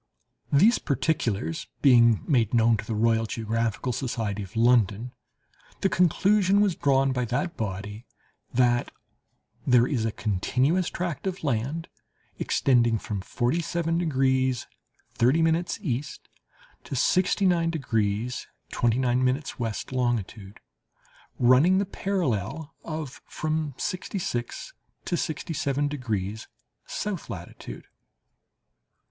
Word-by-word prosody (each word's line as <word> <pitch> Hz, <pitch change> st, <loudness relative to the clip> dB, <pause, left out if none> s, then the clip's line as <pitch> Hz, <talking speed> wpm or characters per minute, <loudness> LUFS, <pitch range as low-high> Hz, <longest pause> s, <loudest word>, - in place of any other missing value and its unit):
These 205 Hz, +12 st, +5 dB
particulars 115 Hz, -, -1 dB, 0.2 s
being 115 Hz, -5 st, +6 dB
made 120 Hz, -, +2 dB
known 115 Hz, 0 st, +4 dB
to 105 Hz, -, -6 dB
the 110 Hz, -, -3 dB
Royal 115 Hz, +1 st, +2 dB
Geographical 115 Hz, +2 st, -2 dB
Society 110 Hz, -5 st, -2 dB
of 100 Hz, +3 st, -9 dB
London, 115 Hz, -1 st, +3 dB, 0.7 s
the 195 Hz, -, +3 dB
conclusion 195 Hz, +3 st, +3 dB
was 205 Hz, -3 st, +3 dB
drawn 135 Hz, -1 st, +2 dB
by 125 Hz, -1 st, -1 dB
that 125 Hz, +9 st, -2 dB
body 105 Hz, +2 st, -5 dB, 0.4 s
"that 120 Hz, -1 st, +2 dB, 0.8 s
there 125 Hz, -2 st, +5 dB
is 125 Hz, -4 st, -1 dB
a 115 Hz, -, 0 dB
continuous 130 Hz, -, 0 dB
tract 175 Hz, 0 st, -4 dB
of 185 Hz, -2 st, -4 dB
land 140 Hz, +5 st, -1 dB, 0.5 s
extending 120 Hz, -4 st, +2 dB
from 105 Hz, -2 st, -4 dB
47 165 Hz, -, -1 dB
degrees 130 Hz, -5 st, +1 dB, 0.5 s
30' 160 Hz, +7 st, +2 dB, 0.2 s
E. 135 Hz, -5 st, -1 dB, 0.8 s
to -, -, -6 dB
69 180 Hz, -, +2 dB
degrees 120 Hz, -6 st, -1 dB, 0.2 s
29' 125 Hz, +1 st, +1 dB, 0.3 s
W. 115 Hz, -2 st, -2 dB, 0.2 s
longitude, 115 Hz, -5 st, -2 dB, 0.8 s
running 130 Hz, +10 st, +5 dB
the 200 Hz, -, +1 dB
parallel 160 Hz, -, -2 dB
of 155 Hz, -4 st, -6 dB
from 155 Hz, -3 st, -2 dB
sixty 185 Hz, +2 st, -3 dB
six 145 Hz, -, -4 dB, 0.3 s
to 175 Hz, -, -1 dB
sixty 165 Hz, 0 st, -3 dB
seven 145 Hz, 0 st, 0 dB
degrees 110 Hz, -7 st, -3 dB, 0.4 s
south 205 Hz, -5 st, -4 dB
latitude." 85 Hz, -9 st, -8 dB
125 Hz, 105 wpm, -26 LUFS, 115-160 Hz, 0.8 s, being